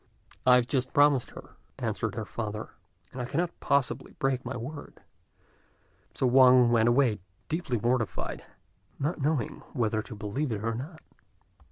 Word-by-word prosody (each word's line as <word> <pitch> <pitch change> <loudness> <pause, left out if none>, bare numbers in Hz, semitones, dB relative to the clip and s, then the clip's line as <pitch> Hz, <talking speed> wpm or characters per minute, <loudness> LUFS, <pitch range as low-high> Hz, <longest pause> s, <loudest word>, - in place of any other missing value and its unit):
"I 125 - +8
have 125 -1 +4
just 130 0 -1
promised 145 -3 +4
her," - - -13 0.2
answered - - -2
her 110 -1 -3
father, 105 0 -5 0.4
"and 125 - -6
I - - -2
cannot 170 +7 -2
possibly 140 -1 0
break 135 -1 -1
my - - -4
word;" 145 +5 -8 1.1
so - - 0
Wang 125 -1 +6
went 115 0 +4
away, 120 -3 +3 0.3
deeply 155 -7 -1
mortified, 120 0 -1 0.5
not 150 +3 -2
knowing 140 -5 -1
whether 110 -4 0
to 110 +1 -10
believe 115 +7 -3
it 105 -1 -3
or 115 0 0
not. 150 +8 -7
125 Hz, 150 wpm, -28 LUFS, 115-140 Hz, 1.1 s, I